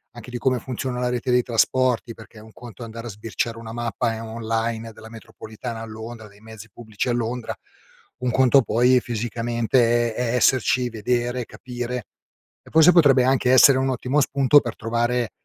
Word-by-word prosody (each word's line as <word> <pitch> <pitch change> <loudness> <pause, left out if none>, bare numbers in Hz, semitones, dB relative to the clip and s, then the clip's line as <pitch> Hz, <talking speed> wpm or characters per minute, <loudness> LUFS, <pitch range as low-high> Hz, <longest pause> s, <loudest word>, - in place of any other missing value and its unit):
anche 120 +1 -11
di 120 - -4
come 130 0 0
funziona 125 0 -5
la 125 - 0
rete 125 +1 -3
dei 125 0 +3
trasporti 120 0 +1
perché 110 0 -15
è - - -13
un 110 0 -16
conto 120 -2 -11
andare 115 +1 -8
a - - -6
sbirciare 115 +2 -4
una 115 -1 -9
mappa, 120 0 -2
ehm, 115 +1 -7
online 115 0 -3
della 110 +1 -13
metropolitana 110 +1 -9
a - - -6
Londra, 110 0 -9
dei 100 +1 -20
mezzi 110 0 -12
pubblici 110 +2 -5
a - - +1
Londra, 120 0 -3 0.7
un 125 -1 -1
conto 130 +1 +4
poi 125 +2 +3
fisicamente 120 +1 0
è 125 -1 -1
è - - +1
esserci, 125 0 +2
vedere, 120 +2 -2
capire; 125 -1 -6 0.6
e - - -17
forse 160 +2 +6
potrebbe 140 -7 +5
anche 130 -1 +2
essere 130 +1 +7
un 135 0 0
ottimo 130 +3 0
spunto 140 +1 +4
per 120 - -6
trovare 120 -1 -1
120 Hz, 185 wpm, -22 LUFS, 115-125 Hz, 0.7 s, essere